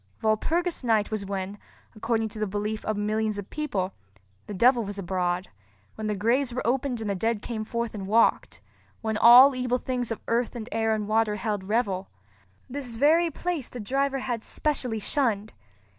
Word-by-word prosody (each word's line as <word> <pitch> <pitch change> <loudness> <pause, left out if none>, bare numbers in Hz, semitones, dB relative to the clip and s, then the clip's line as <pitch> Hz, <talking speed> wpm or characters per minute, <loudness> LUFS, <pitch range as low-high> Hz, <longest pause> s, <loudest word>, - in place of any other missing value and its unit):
Walpurgis 320 +11 +1
Night 220 -3 +2
was 205 -2 -3
when, 195 +1 -4 0.4
according 225 +1 0
to 215 - -9
the 215 - 0
belief 210 +2 -3
of 215 -1 -1
millions 215 0 -1
of 200 -1 -7
people, 210 -12 -2 0.5
the 210 - -5
devil 240 +4 +4
was 205 0 -6
abroad—when 175 - -4
the 210 - -1
graves 240 +6 +1
were 250 - -4
opened 255 0 0
and 215 - -3
the - - +1
dead 220 +2 -1
came 225 -2 -4
forth 235 +1 -3
and 195 -3 -6
walked. 225 +3 +2 0.4
When 220 -1 -1
all 245 +5 +9
evil 250 -1 0
things 250 -2 -3
of 225 - -3
earth 235 +1 0
and 230 -2 -6
air 225 0 +1
and 210 -1 -3
water 215 -1 +2
held 205 -1 -2
revel. 200 -3 -1 0.6
This 255 -3 -6
very 320 +7 +4
place 330 -3 -3
the 250 - -8
driver 275 +5 0
had 245 -4 -3
specially 260 -7 -1
shunned. 215 -3 0
220 Hz, 175 wpm, -26 LUFS, 205-250 Hz, 0.6 s, all